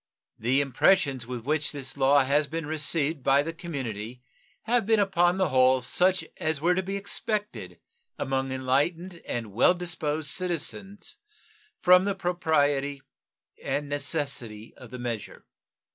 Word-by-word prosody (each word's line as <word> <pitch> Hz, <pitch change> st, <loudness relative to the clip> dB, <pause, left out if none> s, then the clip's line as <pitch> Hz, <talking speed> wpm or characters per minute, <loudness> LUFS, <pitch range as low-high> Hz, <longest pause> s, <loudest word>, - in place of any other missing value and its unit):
The 125 Hz, +5 st, +2 dB
impressions 135 Hz, -2 st, +2 dB
with 125 Hz, -2 st, -5 dB
which 150 Hz, +1 st, 0 dB
this 135 Hz, -2 st, -6 dB
law 140 Hz, 0 st, +4 dB
has 145 Hz, +2 st, +1 dB
been 165 Hz, +1 st, -4 dB
received 155 Hz, 0 st, 0 dB
by 140 Hz, +2 st, +3 dB
the 165 Hz, +2 st, -5 dB
community 125 Hz, -, -6 dB, 0.4 s
have 235 Hz, -2 st, +1 dB
been 225 Hz, -1 st, +4 dB
upon 180 Hz, -2 st, +2 dB
the 190 Hz, -3 st, +1 dB
whole 130 Hz, -1 st, +4 dB
such 180 Hz, +9 st, +1 dB
as 160 Hz, -4 st, -1 dB
were 170 Hz, +4 st, +2 dB
to 185 Hz, -, 0 dB
be 195 Hz, +1 st, -4 dB
expected 200 Hz, -, -3 dB, 0.4 s
among 135 Hz, 0 st, -2 dB
enlightened 155 Hz, +7 st, -1 dB
and 115 Hz, -4 st, -4 dB
well 125 Hz, -, +4 dB
disposed 160 Hz, -4 st, -1 dB
citizens 195 Hz, -, -4 dB, 0.7 s
from 180 Hz, +1 st, +6 dB
the 200 Hz, -1 st, -1 dB
propriety 145 Hz, -6 st, 0 dB, 0.6 s
and 145 Hz, 0 st, -2 dB
necessity 140 Hz, -7 st, -4 dB
of 125 Hz, -, -13 dB
the 125 Hz, -, -8 dB
measure. 120 Hz, -3 st, -6 dB
145 Hz, 140 wpm, -27 LUFS, 130-180 Hz, 0.7 s, from